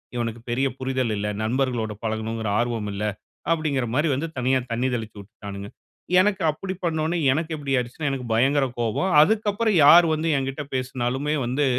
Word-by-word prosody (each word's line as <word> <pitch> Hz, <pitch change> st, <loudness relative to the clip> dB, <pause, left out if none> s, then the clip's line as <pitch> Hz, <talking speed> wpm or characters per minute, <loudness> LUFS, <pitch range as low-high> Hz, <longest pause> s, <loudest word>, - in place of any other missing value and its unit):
இவனுக்கு 115 Hz, -1 st, -3 dB
பெரிய 130 Hz, +3 st, +1 dB
புரிதல் 130 Hz, -3 st, -1 dB
இல்ல. 105 Hz, 0 st, -2 dB, 0.2 s
நண்பர்களோடு 120 Hz, -2 st, -1 dB
பழகணுங்கிற 110 Hz, 0 st, -2 dB
ஆர்வம் 115 Hz, -3 st, -1 dB
இல்ல." 100 Hz, +1 st, -4 dB, 0.5 s
அப்படிங்கிற 155 Hz, -6 st, 0 dB
மாரி 150 Hz, +4 st, +2 dB
வந்து 150 Hz, +5 st, -2 dB
தனியா 130 Hz, +1 st, +2 dB
தண்ணி 120 Hz, +3 st, 0 dB
தெளிச்சு 110 Hz, -3 st, -5 dB
விட்டுட்டாணுங்க. 100 Hz, 0 st, -9 dB, 0.5 s
எனக்கு 195 Hz, 0 st, +2 dB
அப்படி 185 Hz, +5 st, -5 dB
பண்ண 165 Hz, -2 st, 0 dB
ஒன்னே 170 Hz, +2 st, 0 dB, 0.2 s
எனக்கு 160 Hz, +3 st, -2 dB
எப்படி 145 Hz, -2 st, -5 dB
ஆயிடுச்சுன்னா, 125 Hz, +5 st, -2 dB
எனக்கு 130 Hz, -3 st, -4 dB
பயங்கர 135 Hz, +5 st, +3 dB
கோவம். 120 Hz, -, 0 dB
அதுக்கப்பறம் 210 Hz, +3 st, +2 dB
யார் 170 Hz, +4 st, +9 dB
வந்து 155 Hz, +1 st, -1 dB
என்கிட்ட 135 Hz, +2 st, -3 dB
பேசுனாலுமே 130 Hz, +3 st, -1 dB
வந்து 130 Hz, +4 st, 0 dB
130 Hz, 160 wpm, -24 LUFS, 115-155 Hz, 0.5 s, யார்